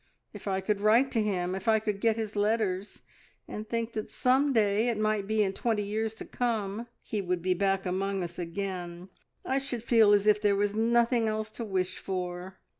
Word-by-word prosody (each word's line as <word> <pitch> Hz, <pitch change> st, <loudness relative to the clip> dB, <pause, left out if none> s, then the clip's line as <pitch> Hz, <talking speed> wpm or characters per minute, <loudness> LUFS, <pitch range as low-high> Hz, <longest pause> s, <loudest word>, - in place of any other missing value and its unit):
If 205 Hz, -1 st, -9 dB
I 190 Hz, -1 st, 0 dB
could 200 Hz, +1 st, -1 dB
write 230 Hz, +6 st, +4 dB
to 225 Hz, -, +1 dB
him, 185 Hz, -4 st, -1 dB
if 190 Hz, +2 st, -5 dB
I 220 Hz, -1 st, +5 dB
could 210 Hz, -2 st, -2 dB
get 225 Hz, -1 st, +3 dB
his 220 Hz, -2 st, -4 dB
letters, 205 Hz, -2 st, -1 dB, 0.4 s
and 215 Hz, +1 st, -7 dB
think 230 Hz, 0 st, -2 dB
that 215 Hz, -, -4 dB
some 265 Hz, +3 st, +2 dB
day, 215 Hz, -1 st, +2 dB
it 235 Hz, -3 st, 0 dB
might 215 Hz, -2 st, 0 dB
be 215 Hz, 0 st, +2 dB
in 195 Hz, -1 st, -1 dB
twenty 220 Hz, -1 st, 0 dB
years 220 Hz, +2 st, -2 dB
to -, -, -8 dB
come, 225 Hz, -2 st, -2 dB, 0.2 s
he 210 Hz, -3 st, -2 dB
would 180 Hz, -2 st, -2 dB
be 185 Hz, 0 st, +2 dB
back 195 Hz, +1 st, 0 dB
among 190 Hz, +1 st, -1 dB
us 170 Hz, 0 st, -7 dB
again, 175 Hz, 0 st, -5 dB, 0.4 s
I 265 Hz, +1 st, +1 dB
should 255 Hz, -4 st, -4 dB
feel 225 Hz, -3 st, +5 dB
as 205 Hz, -1 st, +4 dB
if 210 Hz, -1 st, +4 dB
there 205 Hz, -1 st, +3 dB
was 205 Hz, 0 st, +1 dB
nothing 230 Hz, +1 st, +2 dB
else 215 Hz, 0 st, -2 dB
to 235 Hz, -, -6 dB
wish 190 Hz, -4 st, -2 dB
for." 180 Hz, 0 st, -5 dB
210 Hz, 205 wpm, -29 LUFS, 190-225 Hz, 0.4 s, I